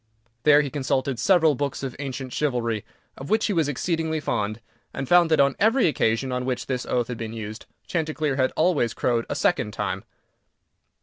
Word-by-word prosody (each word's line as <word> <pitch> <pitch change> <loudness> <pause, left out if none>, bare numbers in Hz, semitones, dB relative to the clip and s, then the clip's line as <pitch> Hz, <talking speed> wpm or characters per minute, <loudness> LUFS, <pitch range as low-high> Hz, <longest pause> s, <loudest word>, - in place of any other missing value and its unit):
There 150 -1 +7
he 140 - -4
consulted 130 -2 -1
several 170 -5 +4
books 140 0 -3
of 130 -2 -4
ancient 130 -2 -5
chivalry, 120 -7 -1 0.3
of 135 - -8
which 220 +1 +2
he 210 - 0
was 160 -5 +1
exceedingly 160 +2 -1
fond, 110 -6 -2 0.4
and 135 - -3
found 175 +1 +5
that, 160 - +3
on 140 -1 +4
every 225 +4 +4
occasion 130 -3 0
on 125 0 -1
which 125 -2 -2
this 125 -2 -3
oath 120 -2 0
had 125 - -5
been 115 -1 -5
used, 110 -1 -7 0.2
Chanticleer 155 -3 -1
had 130 -1 +1
always 150 -9 +2
crowed 115 -2 0
a - - -2
second 105 - +1
time. - - -3
135 Hz, 185 wpm, -24 LUFS, 120-155 Hz, 0.4 s, There